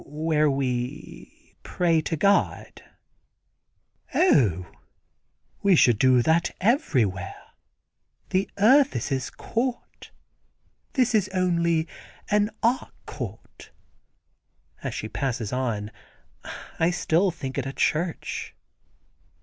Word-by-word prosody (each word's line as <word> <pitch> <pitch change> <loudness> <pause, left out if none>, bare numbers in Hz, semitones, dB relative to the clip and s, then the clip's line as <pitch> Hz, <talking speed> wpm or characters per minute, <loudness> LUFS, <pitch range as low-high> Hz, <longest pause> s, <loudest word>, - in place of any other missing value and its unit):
"Where 155 0 0
we 130 - -4
pray 165 -3 +1
to 160 +1 -3
God." 200 +5 +1 1.3
"Oh, 105 - +3 1.0
we 200 -2 +4
should 120 -8 +4
do 130 -1 +4
that 160 +4 +2
everywhere. 130 - +1 1.0
The 190 +1 +1
earth 265 +7 +5
is - - -2
His 135 -2 -2
court. 240 +1 -4 0.8
This 250 -3 +2
is 205 -3 +2
only 170 -3 +1 0.4
an 210 0 +3
Arc 240 +3 0
court," - - -9 1.1
as - - -4
she - - -4
passes 125 -5 -3
on. 110 -5 -2 0.9
I 165 - +3
still 180 +1 +1
think 135 -5 -5
it 135 - -3
a 135 - -5
church. 165 +4 -2
160 Hz, 100 wpm, -25 LUFS, 130-195 Hz, 1.3 s, earth